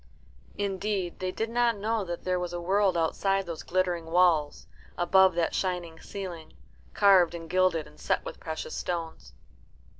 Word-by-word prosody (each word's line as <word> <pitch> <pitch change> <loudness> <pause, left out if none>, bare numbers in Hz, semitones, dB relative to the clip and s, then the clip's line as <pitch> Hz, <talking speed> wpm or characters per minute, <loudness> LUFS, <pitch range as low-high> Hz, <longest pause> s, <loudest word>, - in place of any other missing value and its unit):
Indeed, 195 -2 -2
they 185 0 -2
did 225 +4 -3
not 235 -2 +2
know 220 +1 -1
that 175 -1 -5
there 180 -1 0
was 175 -1 -4
a 175 - -3
world 190 +1 +2
outside 195 +4 +1
those 170 -2 -6
glittering 180 -2 -1
walls, 165 -3 +2 0.3
above 190 +1 +4
that 170 -1 0
shining 175 -3 -2
ceiling, 180 -5 -7 0.4
carved 190 -5 +5
and 165 -1 -7
gilded 180 -3 +2
and 75 - -17
set - - -1
with - - -7
precious 160 0 -5
stones. 165 - -5
180 Hz, 155 wpm, -28 LUFS, 170-195 Hz, 0.4 s, carved